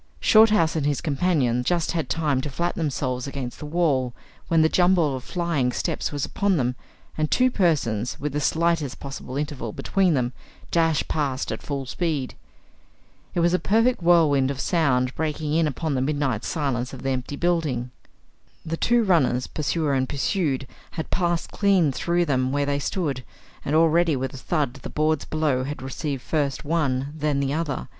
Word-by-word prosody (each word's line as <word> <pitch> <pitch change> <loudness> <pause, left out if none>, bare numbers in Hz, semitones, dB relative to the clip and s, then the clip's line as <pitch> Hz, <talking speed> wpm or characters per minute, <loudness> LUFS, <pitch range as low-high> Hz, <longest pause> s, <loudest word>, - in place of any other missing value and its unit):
Shorthouse 215 -7 +5
and 155 - 0
his 145 -1 +1
companion 140 -6 +1
just 170 +4 0
had 165 -2 -2
time 150 -5 +1
to 150 - -4
flatten 170 +6 -2
themselves 130 -4 -2
against 135 -3 -5
the 150 - -6
wall 145 -7 +1 0.3
when 165 -1 +4
the - - +5
jumble 175 -4 +3
of 130 - -6
flying 165 -8 0
steps - - -2
was 145 -1 -2
upon 200 -3 0
them, 125 -2 0 0.4
and 155 -1 +1
two 255 0 +3
persons, 135 - 0
with 145 0 -3
the 150 - 0
slightest 160 -3 0
possible 135 -1 -6
interval 145 -6 -3
between 185 - +1
them, 125 -1 0 0.4
dashed 165 -3 +2
past 140 -3 -1
at - - -4
full 140 -2 -4
speed. 145 -1 -2 1.0
It 175 - +2
was 170 +1 +3
a 180 - +3
perfect 230 +2 +2
whirlwind 155 -6 +4
of 140 -2 -4
sound 130 -7 +1
breaking 150 -1 -2
in 165 0 +3
upon 150 +2 -2
the 130 - 0
midnight 135 -5 -1
silence 135 -5 -2
of 130 - -8
the 135 - 0
empty 130 +2 -3
building. 150 -8 0 0.7
The 165 +1 -3
two 240 +4 +3
runners, 140 - +2
pursuer 155 -1 -1
and 130 -1 0
pursued, 140 -2 0 0.3
had 160 - -5
passed 175 -2 0
clean 195 -7 +3
through 175 +6 0
them 130 -3 +1
where 145 0 +1
they 140 0 0
stood, 140 -5 -2 0.4
and 145 - -1
already 165 0 +4
with 130 0 -3
a - - -7
thud 145 -1 -1
the - - -6
boards 155 -1 0
below 150 -5 0
had 145 0 -5
received 135 0 -4
first 145 -3 -1
one, 140 -3 0
then 150 -2 0
the 140 0 0
other. 155 -4 -2
150 Hz, 180 wpm, -24 LUFS, 135-170 Hz, 1.0 s, Shorthouse